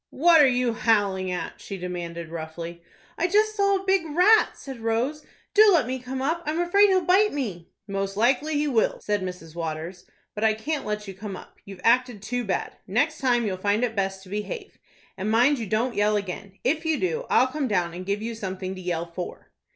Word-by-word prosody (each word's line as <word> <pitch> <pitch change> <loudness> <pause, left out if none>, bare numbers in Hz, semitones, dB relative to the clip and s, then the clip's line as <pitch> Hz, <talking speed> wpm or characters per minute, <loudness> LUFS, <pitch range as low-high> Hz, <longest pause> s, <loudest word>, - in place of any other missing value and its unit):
"What 330 +2 +5
are 285 - +7
you 250 -2 +1
howling 205 -5 +1
at?" 180 -2 -5
she 195 - -6
demanded, 170 -2 -5
roughly. 165 +1 -7 0.4
"I 350 - +2
just 430 +3 +2
saw 400 -1 +3
a 385 0 -3
big 385 -2 +3
rat," 365 +8 +4
said 265 -3 -8
Rose. 235 +7 -1 0.3
"Do 425 - +6
let 330 -9 +4
me 260 +2 -3
come 260 +1 -5
up; 325 +5 0
I'm 310 +2 -1
afraid 395 +4 +5
he'll 370 -2 +2
bite 405 +4 +4
me." 200 - -4 0.2
"Most 195 0 -3
likely 265 +7 +2
he 295 +1 +1
will," 235 -6 +1
said 205 -1 -1
Mrs. 180 -4 -7
Waters. 165 +2 -5 0.3
"But 210 - -4
I 220 -1 +4
can't 290 +6 -3
let 210 0 -3
you 195 - -6
come 195 +1 -7
up. - - -15
You've 195 -2 -10
acted 240 -2 +2
too 245 +3 -2
bad. 195 -4 -3
Next 290 +10 +1
time 245 -3 +2
you'll 190 -3 -2
find 205 +4 +1
it 230 -2 -1
best 190 -1 -2
to 190 - -14
behave. 390 - -5 0.4
And, 200 +2 -2
mind 245 +5 +4
you 225 - -4
don't 230 +5 0
yell 210 0 +2
again! 195 0 -6
If 310 +6 +1
you 320 -2 0
do, 465 +6 -1
I'll - - +5
come 275 +1 -2
down 180 -6 0
and 180 +1 -6
give 200 +3 -2
you 230 +1 -3
something 190 -3 -5
to 185 - -8
yell 175 -2 -2
for." 170 +1 -8
225 Hz, 215 wpm, -25 LUFS, 190-295 Hz, 0.4 s, are